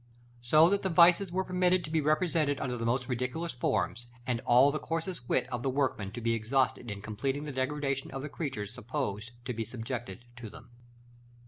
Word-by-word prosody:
So 155 +7 +6
that 200 - +2
the 190 - -1
vices 175 +2 +5
were 190 +2 0
permitted 180 -1 +2
to 155 - -7
be 160 -1 +2
represented 155 -1 +1
under 125 -2 -2
the 115 -1 -2
most 125 +1 0
ridiculous 125 +7 -2
forms, 120 0 -1 0.2
and 120 -2 0
all 125 +4 +6
the 155 - -2
coarsest 165 -5 -4
wit 125 - +2
of 120 -1 -2
the 135 - 0
workman 130 -7 -1
to 120 - -6
be 115 0 +1
exhausted 120 +2 0
in 100 -1 -6
completing 135 +7 -2
the 150 - -5
degradation 135 +1 -2
of 135 0 -6
the - - -3
creatures 120 -10 -4
supposed 125 -3 -4 0.2
to 125 - -2
be 115 0 -2
subjected 120 +1 -6
to 115 -2 -7
them. 120 - -14
130 Hz, 200 wpm, -30 LUFS, 120-155 Hz, 0.2 s, So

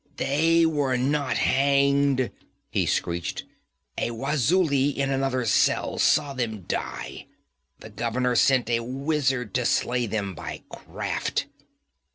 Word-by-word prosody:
'They 165 +4 +3
were 145 -5 +1
not 140 +2 0
hanged!' 140 -1 +2 0.4
he - - 0
screeched. 85 0 -2 0.6
'A - - 0
Wazuli 140 +3 +1
in 140 0 0
another 135 -2 0
cell 105 - +1
saw 140 - +3
them 115 -5 -3
die! - - -5 0.5
The - - -11
governor 125 +2 -1
sent 130 -2 +3
a 115 -1 +1
wizard 130 -2 -1
to 125 - +1
slay 120 0 +1
them 100 -2 -3
by 80 - -7
craft!' - - -3
130 Hz, 120 wpm, -25 LUFS, 120-140 Hz, 0.6 s, They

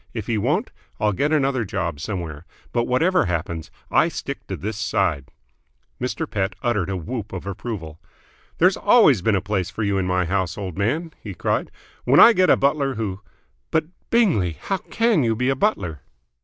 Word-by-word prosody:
If 110 -4 -3
he 115 -3 0
won't, 150 - 0 0.3
I'll 105 -1 +2
get 145 +10 0
another 135 -5 +2
job 85 -7 -3
somewhere. 85 -3 -5 0.3
But, 120 -1 +1
whatever 165 +10 +2
happens, 85 -2 -3 0.2
I - - +4
stick - - -6
to - - -4
this 105 +3 -4
side!" 95 -10 0 0.7
Mr. 130 +5 -2
Pett 95 -4 -2
uttered 105 -7 0
a 95 - -2
whoop 110 +4 -5
of 95 -1 -6
approval. 95 -6 -6 0.6
"There's 185 +3 +4
always 200 - +5
been 110 +2 +2
a 95 - +1
place 95 -3 -1
for 105 +5 -4
you 100 -1 +1
in 90 - -1
my 90 -1 +1
house, 95 0 -1
old 95 -5 -5
man!" 150 - -1
he 100 -4 -7
cried. - - -1 0.3
"When 135 +4 +5
I 235 - +10
get 185 -3 +3
a - - +6
butler 140 -1 +1
who 105 -3 -3 0.3
" - - -45
"But, - - +1 0.2
Bingley! 155 - +2
How 195 - -2
can 225 - +1
you 115 -1 +1
be 125 +4 0
a 135 - +2
butler?" 90 - -1
105 Hz, 190 wpm, -22 LUFS, 90-135 Hz, 0.7 s, I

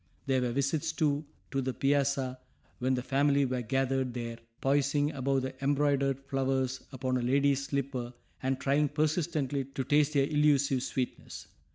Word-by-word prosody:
There 130 -1 +2
were 125 -1 0
visits, 140 +5 0
too, 150 -1 0 0.3
to 135 - 0
the 130 -1 -3
piazza, 135 -2 +1 0.4
when 130 +1 +1
the 125 - -3
family 140 +1 +2
were 125 -1 -1
gathered 135 0 0
there, 115 -1 -4 0.2
poising 145 +2 +2
above 135 -1 0
the 130 0 -3
embroidered 140 -1 +2
flowers 135 -1 -1
upon 130 -1 -1
a - - -1
lady's 140 +2 +2
slipper 135 -3 -2 0.3
and 130 0 -1
trying 145 +2 +2
persistently 150 -2 0
to 135 0 -4
taste 150 +3 +3
their 140 -2 +3
illusive 145 -3 +3
sweetness. 130 0 -4
135 Hz, 155 wpm, -30 LUFS, 130-145 Hz, 0.4 s, taste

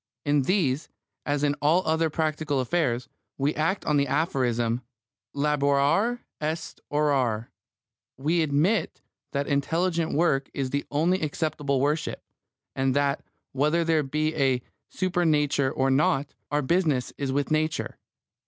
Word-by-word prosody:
In 145 0 +3
these, 150 -3 0 0.4
as 145 0 0
in 145 -1 +3
all 160 +5 +3
other 160 +1 +2
practical 155 -2 -1
affairs, 125 -3 0 0.3
we 140 +2 +1
act 165 +6 -1
on 150 -2 +2
the 140 0 +2
aphorism, 125 -6 0 0.5
Laborare 145 +10 +2 0.2
est 155 +2 -3
orare; 135 -7 +1 0.7
we 160 +6 +1
admit 160 +6 +1 0.3
that 140 0 -1
intelligent 165 +4 0
work 140 -4 +2
is 135 -2 -2
the 140 0 -2
only 170 +6 +1
acceptable 145 -2 -1
worship, 150 +4 -1 0.5
and 135 0 +1
that, 140 -1 +1 0.3
whether 150 +5 +2
there 160 -1 +2
be 155 +3 -1
a 130 -3 +1 0.3
Supernature 155 -7 +1
or 135 0 +1
not, 140 0 +2 0.2
our 145 0 0
business 150 -4 +1
is 140 -2 -1
with 140 +2 -1
Nature. 155 0 -1
145 Hz, 130 wpm, -26 LUFS, 135-160 Hz, 0.7 s, In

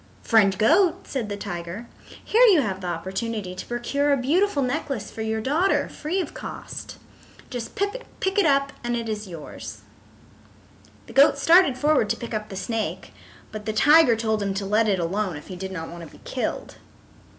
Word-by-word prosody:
"Friend 200 -4 +4
Goat," 330 - +3
said 240 -6 -3
the 205 - -4
tiger, 175 +4 -6 0.4
"here 455 - +3
you 365 -9 +6
have 195 -6 -3
the 180 - -4
opportunity 190 +3 -3
to 185 - -7
procure 280 +4 0
a 280 - +4
beautiful 295 +4 +1
necklace 260 -4 -3
for 225 - -7
your 220 0 -1
daughter, 315 - +1
free 325 +5 -3
of 370 - -3
cost. - - -8 0.5
Just 245 -3 -6
pick 405 -2 -3
it 400 - +4
up 275 0 +2
and 240 0 -1
it 230 -1 -3
is 215 -1 -4
yours." 165 -4 -9 1.2
The - - -12
goat 280 +1 +6
started 325 -2 +5
forward 290 -6 +2
to - - 0
pick 235 - -7
up 215 0 -3
the 195 - -7
snake, 190 -4 -3 0.4
but 215 0 -7
the 215 - -1
tiger 295 +2 +6
told 220 -1 -1
him 200 -1 -1
to 195 0 -2
let 215 +3 +2
it 200 -2 +2
alone 185 +1 -1
if 145 - -10
he 185 - -6
did 190 +1 -6
not 165 -3 -5
want 170 0 -9
to 160 - -11
be - - -23
killed. - - -4
225 Hz, 190 wpm, -24 LUFS, 195-285 Hz, 1.2 s, you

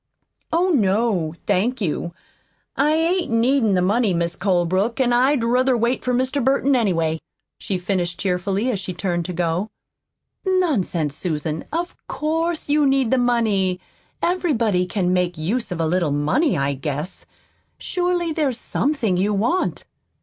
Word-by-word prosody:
"Oh, 350 +3 +2
no, 200 - +1
thank 210 +6 +1
you. 170 -3 -2 0.6
I 295 +3 +2
ain't 335 +1 +1
needin' 230 -2 +3
the 180 - +2
money, 205 0 +2
Mis' 170 0 -1
Colebrook, 185 +4 0
an' 245 -2 +3
I'd 255 +1 +3
ruther 250 +2 +2
wait 235 +3 0
for 250 - 0
Mr. 260 +2 0
Burton, 275 +1 +2
anyway," 165 -9 +1 0.4
she 190 - -2
finished 180 -1 -2
cheerfully, 195 +5 0
as 205 - -2
she 185 -2 -5
turned 175 -2 -2
to 180 - -4
go. 175 +4 -1 0.7
"Nonsense, 245 - 0
Susan, 155 -2 -3
of 345 +2 -3
COURSE 325 +2 -1
you 295 0 +3
need 270 -3 +2
the 260 - +3
money. 215 -7 +1 0.4
Everybody 235 - +1
can 180 -2 0
make 180 -1 0
use 210 +10 -2
of 175 - -3
a 165 - +1
little 170 0 +1
money, 155 - +1
I 140 0 0
guess. 145 +5 -5 0.5
Surely, 355 -2 -1
there's 285 -6 0
SOMETHING 245 -9 0
you 205 +3 +1
want." 240 - 0
210 Hz, 150 wpm, -21 LUFS, 180-270 Hz, 0.7 s, needin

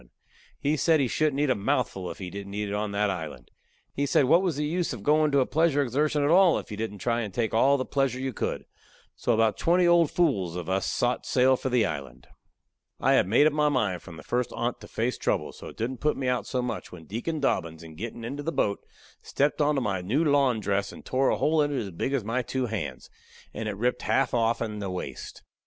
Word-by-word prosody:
He 150 +2 0
said 160 +1 +3
he 135 - +2
shouldn't 150 +2 0
eat 150 -3 +2
a - - +2
mouthful 95 -2 -1
if - - -7
he 90 -2 -7
didn't 100 +1 -7
eat 105 0 -2
it - - -3
on 105 0 -2
that 100 0 +1
island. 80 -9 -7 0.4
He 140 +1 -1
said 140 - +3
what 170 +7 +5
was 180 -6 0
the 150 +1 -1
use 170 +1 -1
of 110 -5 -8
going 155 +3 +3
to 140 -1 +3
a - - +2
pleasure 155 -1 +2
exertion 145 +3 0
at 145 - +2
all 180 -1 +6
if - - -7
you - - -4
didn't 110 -2 -4
try 120 +3 0
to 110 - -3
take 110 +3 -2
all 135 +5 +4
the 130 - -2
pleasure 135 -3 0
you 130 -1 -3
could. - - -3 0.5
So - - -1
about 110 -2 +2
twenty 175 +2 +3
old 170 -3 +5
fools 100 - +1
of 90 -2 -5
us 95 +1 0
sot 125 0 -1
sail 130 0 +4
for 130 - -3
the 125 -3 +3
island. 70 -8 -6 0.7
I - - +3
had - - +4
made 120 +9 +4
up 155 - +3
my 150 0 +2
mind 105 - 0
from 85 -3 -11
the 75 - -11
first 125 0 -1
on't 120 +1 -2
to - - -10
face 120 +3 -2
trouble, - - -1
so - - -10
it - - -11
didn't 120 +3 -3
put 150 0 +1
me 135 - -2
out 125 -1 0
so 125 -2 -1
much 125 - -5
when 85 -3 -11
Deacon 120 - -3
Dobbins, 85 - -1
in 80 -1 -11
gettin' 115 +6 -6
into 140 +5 -5
the 160 +3 -2
boat, 100 -10 0 0.4
stepped 145 +2 0
onto 145 -2 +2
my 100 -6 -1
new 120 - +1
lawn 140 -5 +3
dress 100 -1 -1
and - - -12
tore 130 +1 +1
a - - +1
hole 155 0 +2
in 145 0 +1
it 140 - -1
as 100 -3 -5
big 90 +10 -3
as 135 -5 0
my 115 +5 -1
two 130 +1 -2
hands, 110 -3 -5 0.4
and 110 -1 -3
ripped 125 +2 0
it - - -8
half 135 -2 +1
offen 115 -2 0
the 100 -2 -4
waist. 90 -1 -7
125 Hz, 250 wpm, -27 LUFS, 105-145 Hz, 0.7 s, all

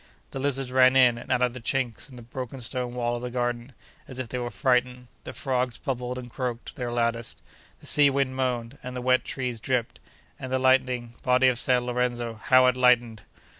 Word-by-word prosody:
The 135 - -5
lizards 135 -2 -1
ran 130 0 +5
in 125 -3 +5
and - - -8
out 125 - +2
of 125 -1 +1
the 125 - -7
chinks 125 +1 -2
in 130 - -13
the 120 - -11
broken 130 +2 -7
stone 125 0 -3
wall 120 -1 -1
of 120 - -5
the 125 - -4
garden, 120 +1 -3 0.3
as 130 - -7
if 130 -3 -4
they 125 - -3
were 120 0 -3
frightened; 125 +2 0 0.2
the - - -6
frogs 130 -2 -1
bubbled 125 -3 -4
and 120 -1 -8
croaked 120 -2 -5
their 125 -2 -4
loudest; 115 -1 -2 0.4
the - - -14
sea 145 -1 +4
wind 135 -1 0
moaned, 125 -1 -2
and 125 0 -6
the - - -2
wet 130 0 +3
trees 125 -3 -4
dripped; 120 0 -2 0.4
and 130 -1 -6
the 130 - +2
lightning—body 130 -1 +2
of 120 -2 +2
San 125 -1 +2
Lorenzo, 120 -1 -1
how 130 +3 +4
it 125 0 +3
lightened! 120 -3 +3
125 Hz, 205 wpm, -26 LUFS, 120-130 Hz, 0.4 s, ran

